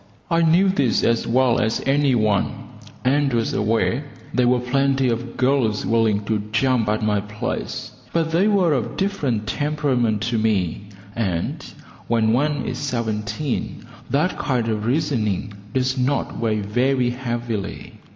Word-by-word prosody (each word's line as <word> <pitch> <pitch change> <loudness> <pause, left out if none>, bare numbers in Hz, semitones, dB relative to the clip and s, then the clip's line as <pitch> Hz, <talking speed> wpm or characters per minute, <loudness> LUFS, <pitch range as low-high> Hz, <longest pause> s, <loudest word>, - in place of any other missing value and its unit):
I 165 0 +3
knew 170 +4 +4
this 130 - +1
as 115 0 +1
well 125 0 +3
as 110 +1 0
any 140 -1 +3
one, 105 -3 0 0.4
and 140 +1 +2
was 115 -2 0
aware 115 +5 +1 0.3
there 125 -1 +3
were 125 0 +3
plenty 135 +1 +1
of 120 +1 -3
girls 125 -5 +1
willing 110 -2 +2
to 105 -1 0
jump 120 -1 +2
at 110 +1 0
my 105 -1 +1
place; 105 +1 -4 0.2
but 165 -1 0
they 175 +5 +3
were 190 -6 +3
of 125 -6 -2
different 145 - -1
temperament 135 -7 0
to 120 -1 0
me, 100 -4 0 0.3
and 95 -7 -2 0.5
when 115 -1 +2
one 145 +2 +1
is 125 - -3
seventeen, 115 0 -3 0.2
that 150 +6 0
kind 120 -4 0
of 110 0 -2
reasoning 120 - 0 0.2
does 130 +1 0
not 135 +2 -1
weigh 110 -2 0
very 125 +4 +1
heavily. 120 -5 -4
120 Hz, 145 wpm, -22 LUFS, 110-140 Hz, 0.5 s, knew